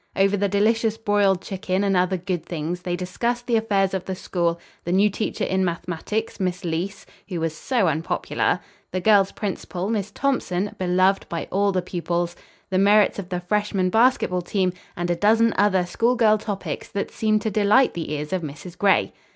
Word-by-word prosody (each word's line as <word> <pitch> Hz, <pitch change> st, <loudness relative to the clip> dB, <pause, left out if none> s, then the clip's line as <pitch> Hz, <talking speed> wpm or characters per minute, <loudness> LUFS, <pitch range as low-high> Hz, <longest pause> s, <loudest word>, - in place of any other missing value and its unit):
Over 195 Hz, +1 st, +3 dB
the 200 Hz, 0 st, 0 dB
delicious 220 Hz, +2 st, +2 dB
broiled 205 Hz, -4 st, +2 dB
chicken 190 Hz, 0 st, -2 dB
and 195 Hz, -1 st, +2 dB
other 185 Hz, +1 st, +2 dB
good 180 Hz, -2 st, -3 dB
things 170 Hz, +1 st, -4 dB
they 175 Hz, -1 st, -2 dB
discussed 235 Hz, +7 st, -2 dB
the 240 Hz, -, +1 dB
affairs 200 Hz, -4 st, +1 dB
of 190 Hz, -2 st, -2 dB
the 190 Hz, -, -3 dB
school, 170 Hz, -2 st, -1 dB, 0.2 s
the 175 Hz, -, -3 dB
new 200 Hz, +3 st, +4 dB
teacher 215 Hz, -, -3 dB
in 190 Hz, 0 st, +1 dB
mathematics, 175 Hz, +5 st, -3 dB
Miss 180 Hz, -2 st, -2 dB
Leece, 175 Hz, +4 st, -3 dB, 0.2 s
who 180 Hz, -3 st, -3 dB
was 160 Hz, -1 st, -2 dB
so 235 Hz, +1 st, 0 dB
unpopular; 160 Hz, +1 st, 0 dB, 0.3 s
the 185 Hz, -, -1 dB
girls' 200 Hz, 0 st, +4 dB
principal, 195 Hz, -1 st, -4 dB
Miss 210 Hz, -3 st, -1 dB
Thompson, 205 Hz, -6 st, -1 dB
beloved 185 Hz, +1 st, +2 dB
by 170 Hz, -, -4 dB
all 200 Hz, +1 st, +2 dB
the 185 Hz, -2 st, -1 dB
pupils; 175 Hz, -1 st, -2 dB, 0.4 s
the 185 Hz, -, +2 dB
merits 205 Hz, +1 st, +4 dB
of 185 Hz, -3 st, -7 dB
the 180 Hz, -1 st, -2 dB
Freshman 195 Hz, 0 st, 0 dB
Basketball 225 Hz, -6 st, +3 dB
Team 185 Hz, 0 st, 0 dB, 0.2 s
and 175 Hz, 0 st, -1 dB
a -, -, +2 dB
dozen 225 Hz, +5 st, +3 dB
other 190 Hz, -3 st, +3 dB
schoolgirl 225 Hz, +3 st, +2 dB
topics 205 Hz, -2 st, -4 dB
that 200 Hz, -, -3 dB
seemed 215 Hz, -1 st, +1 dB
to 220 Hz, -, -1 dB
delight 215 Hz, +6 st, +4 dB
the 165 Hz, -3 st, -5 dB
ears 150 Hz, +2 st, -3 dB
of 185 Hz, -, 0 dB
Mrs. 160 Hz, +3 st, -8 dB
Gray. 195 Hz, 0 st, +3 dB
190 Hz, 185 wpm, -23 LUFS, 180-210 Hz, 0.4 s, new